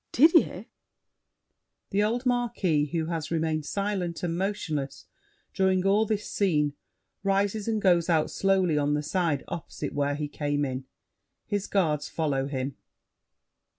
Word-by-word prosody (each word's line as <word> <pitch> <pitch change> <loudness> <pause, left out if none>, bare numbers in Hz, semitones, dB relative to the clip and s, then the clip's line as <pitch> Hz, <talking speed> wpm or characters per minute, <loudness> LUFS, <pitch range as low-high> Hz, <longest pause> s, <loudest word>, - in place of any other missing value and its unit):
Didier? 325 +6 +4 1.3
[The 200 - +2
old 235 +4 0
Marquis, 215 -11 +1
who 160 +1 -1
has 165 -2 -3
remained 160 -2 -1
silent 195 -4 -2
and 170 -1 -1
motionless 170 -7 -3 0.5
during 190 -1 +2
all 205 +3 +3
this 210 -1 -1
scene, 150 -7 +1 0.5
rises 200 +2 0
and 220 -1 +1
goes 175 -4 +3
out 160 -2 +2
slowly 190 -5 +2
on 145 0 +1
the 150 - -1
side 160 -3 0
opposite 150 -3 -5
where 145 0 0
he 150 0 -3
came 145 0 -1
in. 130 0 -4 0.6
His 205 -1 -2
guards 155 -7 +1
follow 140 -4 -1
him. 135 -1 -3
170 Hz, 135 wpm, -27 LUFS, 150-200 Hz, 1.3 s, Didier